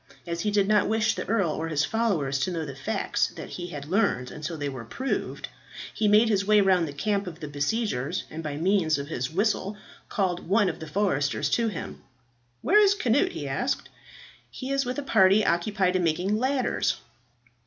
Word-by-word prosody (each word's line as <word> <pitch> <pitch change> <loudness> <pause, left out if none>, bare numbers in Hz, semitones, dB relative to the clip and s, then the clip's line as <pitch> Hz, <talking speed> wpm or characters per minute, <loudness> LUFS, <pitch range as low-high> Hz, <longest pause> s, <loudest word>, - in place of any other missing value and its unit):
As 170 -1 -3
he 215 - 0
did 205 -1 +2
not 210 -1 +3
wish 220 0 +2
the 185 - -5
earl 200 -7 +2
or 160 +2 -3
his 150 -2 +1
followers 180 -13 0
to 185 - 0
know 165 -2 -3
the 140 -2 -7
facts 135 0 -1
that - - -8
he 175 -1 -6
had 145 -5 -7
learned 155 - 0
until 155 +2 -5
they 145 -1 -3
were 130 -4 -6
proved, 260 - -3 0.5
he 215 - +1
made 210 +3 +5
his 200 -3 +2
way 210 +1 +4
round 185 -4 +3
the - - -5
camp 200 +7 -1
of 170 -2 -7
the 155 - -6
besiegers, 145 - -1
and 160 - -5
by 150 -2 -4
means 170 -2 +2
of 140 +1 -6
his 130 -4 -2
whistle 200 +2 0 0.3
called 180 -4 -1
one 200 +1 +3
of 160 - -6
the 160 - -7
foresters 150 -5 0
to 230 -1 +2
him. 205 -7 -6 0.6
"Where 415 +5 +5
is 400 -1 +5
Cnut?" 285 - +2
he - - -5
asked. - - -2 0.6
"He 260 +1 -6
is 275 -1 +1
with 250 +1 -3
a 290 - -2
party 210 -4 +4
occupied 185 +1 +1
in 185 - +2
making 175 +5 +1
ladders." 260 +3 0
190 Hz, 200 wpm, -26 LUFS, 155-215 Hz, 0.6 s, made